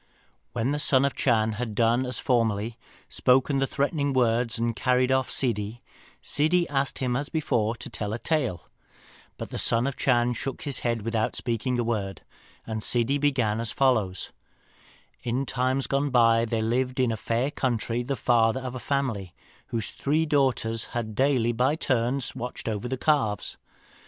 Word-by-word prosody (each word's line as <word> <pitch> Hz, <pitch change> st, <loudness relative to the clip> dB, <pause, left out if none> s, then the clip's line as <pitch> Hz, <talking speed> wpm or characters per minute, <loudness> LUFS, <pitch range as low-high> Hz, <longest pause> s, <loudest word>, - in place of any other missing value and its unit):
When 120 Hz, +3 st, 0 dB
the 145 Hz, -, -1 dB
Son 135 Hz, -2 st, +4 dB
of 140 Hz, -, +1 dB
the -, -, -13 dB
Chan 110 Hz, -4 st, +2 dB
had 110 Hz, 0 st, -4 dB
done 120 Hz, +3 st, +2 dB
as 125 Hz, -, -2 dB
formerly, 115 Hz, -2 st, 0 dB, 0.3 s
spoken 135 Hz, +2 st, +2 dB
the 135 Hz, -, +1 dB
threatening 140 Hz, 0 st, 0 dB
words, 120 Hz, -2 st, +2 dB
and 115 Hz, 0 st, -1 dB
carried 125 Hz, +1 st, +2 dB
off 130 Hz, -1 st, +2 dB
Ssidi, 110 Hz, -2 st, -2 dB, 0.4 s
Ssidi 170 Hz, +4 st, +2 dB
asked 140 Hz, -1 st, 0 dB
him 125 Hz, -2 st, -1 dB
as 140 Hz, +3 st, -2 dB
before 115 Hz, -8 st, 0 dB
to -, -, -8 dB
tell 105 Hz, -1 st, -4 dB
a 110 Hz, -, -2 dB
tale; 130 Hz, -, -1 dB, 0.7 s
but -, -, -7 dB
the -, -, -3 dB
Son 115 Hz, +1 st, +2 dB
of 140 Hz, -, -1 dB
the -, -, -23 dB
Chan 125 Hz, -2 st, +3 dB
shook 135 Hz, +2 st, -5 dB
his 140 Hz, -2 st, 0 dB
head 115 Hz, -3 st, -1 dB
without 115 Hz, -1 st, -1 dB
speaking 120 Hz, +1 st, -1 dB
a 120 Hz, -, +1 dB
word, 100 Hz, -6 st, -2 dB, 0.4 s
and 110 Hz, -1 st, -4 dB
Ssidi 125 Hz, +5 st, +1 dB
began 125 Hz, -7 st, +1 dB
as 115 Hz, -2 st, -3 dB
follows: 110 Hz, -10 st, +1 dB, 0.9 s
"In 125 Hz, +3 st, -1 dB
times 130 Hz, +1 st, 0 dB
gone 140 Hz, +1 st, 0 dB
by 115 Hz, -2 st, +4 dB
there 110 Hz, -1 st, -1 dB
lived 125 Hz, +3 st, 0 dB
in 125 Hz, -2 st, +3 dB
a -, -, -1 dB
fair 115 Hz, +6 st, -1 dB
country 120 Hz, -3 st, -1 dB
the 135 Hz, +3 st, -2 dB
father 120 Hz, +1 st, +2 dB
of 130 Hz, -1 st, -5 dB
a 130 Hz, -, -5 dB
family, 115 Hz, -8 st, -2 dB, 0.3 s
whose 115 Hz, -1 st, -3 dB
three 155 Hz, +3 st, 0 dB
daughters 130 Hz, -7 st, +1 dB
had 110 Hz, -2 st, -2 dB
daily 130 Hz, -1 st, +2 dB
by 125 Hz, +5 st, +1 dB
turns 130 Hz, -3 st, 0 dB
to -, -, -9 dB
watch 125 Hz, 0 st, -6 dB
over 110 Hz, +2 st, -2 dB
the 130 Hz, +1 st, -2 dB
calves. 125 Hz, -8 st, 0 dB
125 Hz, 180 wpm, -26 LUFS, 115-135 Hz, 0.9 s, Son